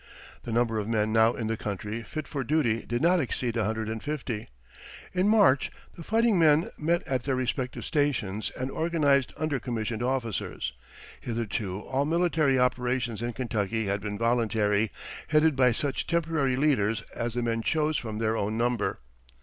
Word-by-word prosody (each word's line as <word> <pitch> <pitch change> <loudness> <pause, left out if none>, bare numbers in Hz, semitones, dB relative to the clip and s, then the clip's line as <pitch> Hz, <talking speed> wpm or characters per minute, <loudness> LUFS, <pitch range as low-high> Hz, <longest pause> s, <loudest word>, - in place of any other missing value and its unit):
The 120 - -4
number 115 -1 +1
of 105 - -3
men 110 -1 +1
now 110 +1 +5
in 115 - -4
the 110 +1 0
country 105 +2 -4
fit 155 +6 -6
for 140 -2 -3
duty 125 -5 +1
did 120 +3 -1
not 180 +2 +5
exceed 125 -4 -1
a 115 -3 +1
hundred 110 0 -2
and 110 0 -4
fifty. 130 -7 -4 0.7
In 185 +2 +2
March 200 -12 +5 0.3
the 170 - -10
fighting 225 0 +2
men 155 0 +4
met 170 +3 0
at 130 -2 0
their 135 +1 -1
respective 130 0 -2
stations 130 - 0
and 130 +1 -2
organized 145 -5 +2
under 155 -3 -1
commissioned 115 -2 -3
officers; 115 - -2 0.5
hitherto 105 -4 -3
all 135 +5 -1
military 160 -4 +2
operations 125 -2 0
in 120 0 -2
Kentucky 110 -2 -1
had 100 0 -1
been 105 0 -4
voluntary, 110 -2 +1 0.4
headed 155 -1 +4
by 130 -2 +4
such 135 +3 -2
temporary 160 -6 +1
leaders 115 -7 +1
as 120 0 -3
the 120 - 0
men 115 -1 0
chose 155 +4 +1
from 110 -5 -3
their 110 0 0
own 110 0 -1
number. 115 - 0
120 Hz, 170 wpm, -28 LUFS, 110-145 Hz, 0.7 s, now